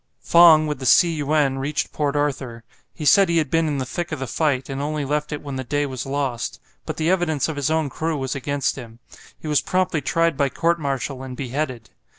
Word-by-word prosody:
Fong, 165 -2 +7
with 150 -3 -3
the 130 - -6
"Tsi 175 +7 +6
yuen," 145 -3 0
reached 145 +3 -2
Port 145 -1 -1
Arthur. 135 -5 -2 0.3
He 155 - -7
said 190 +6 +5
he 170 - +2
had 155 -4 0
been 165 -1 +2
in 145 -2 -1
the 130 - -2
thick 165 +7 -4
of 155 - -2
the 135 - -4
fight, 135 -2 0
and 135 0 -4
only 150 0 -2
left 150 +2 -2
it 150 - -5
when 140 -2 -5
the 130 - -3
day 145 +3 -1
was 130 -2 -5
lost. 135 -5 -3 0.3
But - - -4
the 160 +2 +1
evidence 165 -7 +1
of 160 - -4
his 145 -1 -1
own 160 -1 +1
crew 160 +3 -3
was 130 -2 -3
against 140 0 -2
him. 115 -3 -10 0.4
He - - -8
was 150 -1 +2
promptly 185 -4 0
tried 165 +2 +1
by 140 -2 +2
court 170 +5 0
martial 135 -2 -3
and 130 -1 -7
beheaded. 130 -3 -4
145 Hz, 230 wpm, -22 LUFS, 135-155 Hz, 0.4 s, Fong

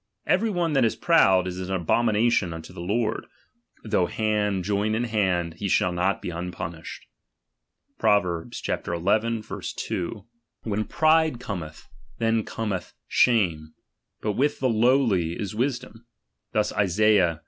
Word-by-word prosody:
Every 220 +5 +2
one 175 -5 0
that 135 -3 +3
is 110 -1 +2
proud, 95 - +4
is 90 0 -5
an 95 +1 -3
abomination 105 0 +2
unto 80 -1 -9
the - - -8
Lord; 110 +6 -1 0.6
though 90 - +1
hand 105 -3 0
join 105 +3 0
iu 115 - 0
hand, 95 -7 0
he 100 - -2
shall 90 - +2
not 90 +2 0
be - - -3
unpunished. 85 -1 -6 0.9
Prov. 90 -5 +1
xi. - - -3
2: 105 0 -2 0.4
When 110 -1 -2
pride 160 -3 +3
comeih, 85 -10 -6 0.3
then 115 -1 +1
Cometh 105 -5 -4
shame; 85 -10 +2 0.5
but 105 - 0
with 145 +7 0
the 130 - +1
lowly 110 -7 +2
is 100 -1 -4
wisdom. 120 -1 -3 0.4
Thus - - 0
Isaiah 100 -3 +3
xl. - - -19
105 Hz, 135 wpm, -25 LUFS, 90-115 Hz, 0.9 s, proud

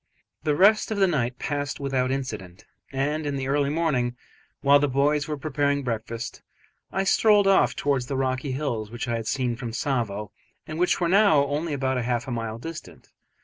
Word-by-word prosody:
The 150 -1 +1
rest 205 +6 +5
of 220 - -2
the 195 - +5
night 130 -8 0
passed 145 -1 -3
without 135 -2 0
incident, 125 -10 -5 0.3
and 145 +3 -1
in 145 - -1
the 135 -1 -3
early 140 0 +1
morning, 140 -6 0 0.5
while 140 +1 +6
the 145 - +2
boys 145 +2 +1
were 150 -1 -3
preparing 140 -1 0
breakfast, 115 -1 -4 0.5
I 195 - 0
strolled 205 +1 +4
off 195 0 +4
towards 135 -4 0
the 135 -1 -2
rocky 130 0 -1
hills 120 -7 -2
which 120 +3 -5
I 120 - 0
had 115 -1 -5
seen 125 -3 0
from 120 -2 -6
Tsavo, 115 -6 -2 0.3
and 155 +1 -6
which 180 - +2
were 175 - +1
now 185 -6 +5
only 150 +3 -2
about 130 -2 0
half 120 0 -1
a - - -4
mile 115 -2 -3
distant. 165 +6 -9
140 Hz, 190 wpm, -25 LUFS, 120-150 Hz, 0.5 s, while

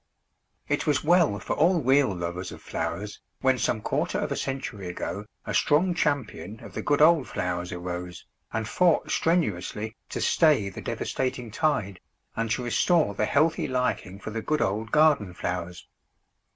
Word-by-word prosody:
It - - -1
was 145 -2 +2
well 170 - +4
for 95 - -3
all 175 +2 +4
real 135 -5 +3
lovers 90 +1 -4
of - - -9
flowers 100 +6 -4 0.2
when 130 -1 +3
some 110 - 0
quarter - - -1
of - - -2
a - - 0
century 130 -8 -4
ago 95 +3 -4 0.2
a - - -3
strong 175 +5 +3
champion 125 - -2
of - - -10
the - - -3
good 145 0 +3
old 160 -4 +5
flowers 90 0 -3
arose, 90 0 -6 0.3
and 110 -1 -2
fought 175 +6 +2
strenuously 110 - 0
to - - -4
stay 150 - +3
the 95 - -8
devastating 130 -3 -3
tide, 100 - 0 0.4
and 115 0 -1
to 125 - -1
restore 150 - +2
the 105 - 0
healthy 155 +7 +2
liking 125 -7 -1
for 110 - -6
the 115 +1 -3
good 155 +6 0
old 110 +3 -2
garden 150 - +3
flowers. 90 0 -4
115 Hz, 165 wpm, -26 LUFS, 95-150 Hz, 0.4 s, old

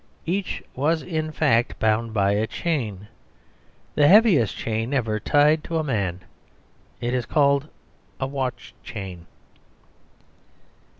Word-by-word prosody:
Each 185 +3 -2
was, 155 +4 0
in 155 -3 -3
fact, 120 -7 +1
bound 110 +1 +1
by 100 -2 +2
a 105 +2 +1
chain; 110 - -3 0.9
the 145 - +4
heaviest 190 - +5
chain 115 +4 -2
ever 110 -5 0
tied 150 +6 +3
to 165 - -2
a 160 - 0
man 100 - -2 0.8
it 120 +1 -2
is 125 -2 -1
called 140 0 +2 0.5
a 135 - -1
watch 135 -2 -4
chain. 95 -5 -8
130 Hz, 120 wpm, -24 LUFS, 110-155 Hz, 0.9 s, heaviest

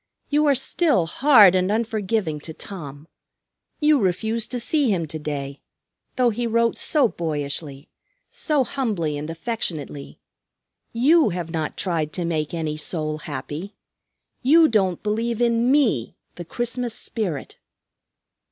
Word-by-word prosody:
You 300 +1 +2
are 280 - +4
still 270 - +2
hard 215 - +6
and 185 +1 +1
unforgiving 215 -7 -1
to 160 +1 -9
Tom. 150 -6 -8 0.7
You 300 -1 +4
refused 220 +4 -1
to 245 - -3
see 280 +2 +1
him 180 -5 0
to 155 +1 -6
day, 140 -2 -5 0.5
though 250 -2 +3
he 235 +2 -2
wrote 230 0 +2
so 290 -5 +3
boyishly, 145 -4 -4 0.4
so 295 -4 0
humbly 210 - -2
and 150 +2 -5
affectionately. 165 -6 -4 0.7
You 285 +4 +4
have 170 -3 -4
not 160 -2 -3
tried 160 -5 -1
to 175 - -2
make 155 -3 -2
any 160 -3 -3
soul 155 -1 -3
happy. 150 +6 -6 0.7
You 315 +5 +6
don't 190 - 0
believe 225 +2 -1
in 235 +1 +2
me, 230 - +1 0.2
the 175 - -8
Christmas 240 +3 -2
Spirit." 190 - -4
195 Hz, 135 wpm, -23 LUFS, 155-240 Hz, 0.7 s, hard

